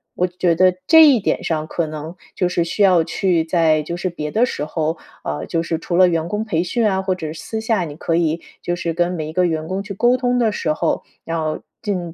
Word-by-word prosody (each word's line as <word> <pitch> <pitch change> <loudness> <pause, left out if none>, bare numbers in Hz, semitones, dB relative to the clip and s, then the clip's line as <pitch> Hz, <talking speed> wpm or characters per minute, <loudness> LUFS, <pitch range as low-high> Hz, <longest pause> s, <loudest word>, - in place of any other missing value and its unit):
我 180 - +1
觉 180 -1 +1
得 185 +2 +4
这 320 +5 +8
一 265 -5 +5
点 - - -1
上 155 -2 -1
可 170 -1 -2
能 155 +2 -7 0.2
就 180 - +1
是 170 -1 0
需 200 +5 0
要 180 -4 +5
去 175 -3 +1
在 160 -2 +2
就 170 +3 -4
是 185 +1 -2
别 150 -3 -5
的 230 +8 +3
时 150 - -4
候 160 +1 -2 0.3
呃， 75 +1 -3
就 165 -1 -1
是 165 -1 -2
除 170 - -3
了 185 0 +6
员 165 -1 -1
工 210 +4 -2
培 170 -7 0
训 225 +6 0
啊， 190 -1 0
或 190 -1 -1
者 160 -4 -5
私 220 +7 -5
下 220 -5 0
你 145 -2 -8
可 165 +1 -1
以 165 -1 0 0.2
就 175 - -2
是 175 -1 -3
跟 175 +2 +1
每 155 -3 -4
一 - - -8
个 180 +1 +2
员 160 -2 -1
工 190 +3 -2
去 200 0 -7
沟 240 +6 +3
通 250 -1 0
的 230 -3 +2
时 155 -6 -1
候， - - -1 0.2
要 160 -2 -2 0.2
尽 180 -5 -3
175 Hz, 265 characters per minute, -20 LUFS, 160-190 Hz, 0.3 s, 这